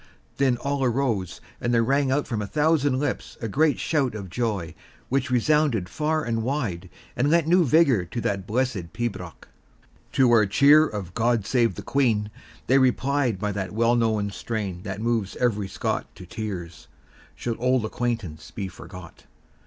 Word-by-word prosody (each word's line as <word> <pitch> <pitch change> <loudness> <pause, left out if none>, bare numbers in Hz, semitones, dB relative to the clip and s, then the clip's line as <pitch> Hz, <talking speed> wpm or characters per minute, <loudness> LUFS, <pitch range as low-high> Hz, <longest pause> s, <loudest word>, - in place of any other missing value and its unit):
Then 130 -3 +2
all 140 +1 -2
arose, 120 -7 -1 0.2
and 120 - 0
there 115 -1 +3
rang 140 +2 +2
out 140 +2 +1
from 115 -6 -3
a 105 - -4
thousand 150 -2 +2
lips 145 -1 -3
a 115 - -3
great 150 +7 +2
shout 140 -7 0
of 95 -5 -7
joy, 100 -8 -2 0.4
which 135 +1 0
resounded 125 -5 +2
far 155 - -1
and 115 -3 -1
wide, 110 -9 -3 0.3
and 145 - +1
lent 165 0 +3
new 175 +2 +4
vigour 140 - +4
to 115 +8 -5
that 100 -2 -2
blessed 110 -7 -2
pibroch. 110 -7 -5 0.7
To 130 -3 +4
our 110 -3 +5
cheer 145 +9 +6
of 95 -5 -6
"God 115 -1 +1
save 120 0 +1
the - - -7
Queen," 110 -7 +1 0.3
they 135 +3 +4
replied 130 -2 +1
by 105 +2 -2
the 95 -2 -3
well 115 +3 +2
known 110 -3 +1
strain 100 -3 -4
that 100 +1 -5
moves 115 -4 -1
every 105 -5 0
Scot - - -2
to 90 - -11
tears, 90 -4 -6 0.5
"Should 115 -2 -4
auld 125 -1 +2
acquaintance 110 -9 -3
be 100 -2 -5
forgot." 90 -1 -12
115 Hz, 170 wpm, -25 LUFS, 100-135 Hz, 0.7 s, cheer